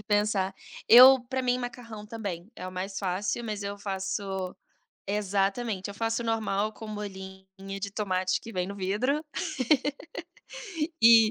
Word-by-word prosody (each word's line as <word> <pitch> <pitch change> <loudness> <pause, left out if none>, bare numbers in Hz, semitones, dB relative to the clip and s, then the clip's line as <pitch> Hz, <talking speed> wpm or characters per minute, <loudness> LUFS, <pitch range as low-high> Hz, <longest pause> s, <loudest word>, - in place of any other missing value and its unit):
em - - -14
pensar. 205 -2 +1 0.3
Eu 255 +3 +10
para 260 0 -1
mim 250 0 +1
macarrão 235 -4 -7
também, 205 -4 -6
é 185 - -7
o - - -5
mais 190 +2 -4
fácil, 200 +4 -1
mas 210 -2 -4
eu 200 0 -4
faço 190 -1 -3 0.5
Exatamente, 200 +1 -1
eu - - -9
faço 225 +2 -1
normal 215 -2 0
com 220 - -10
molhinho 190 -2 -7 0.4
de 200 0 -3
tomate 185 -2 0
que 230 - -10
vem 180 -2 -1
no 200 - -6
vidro 210 +11 0 1.8
e 225 -1 +8
205 Hz, 145 wpm, -28 LUFS, 190-225 Hz, 1.8 s, Eu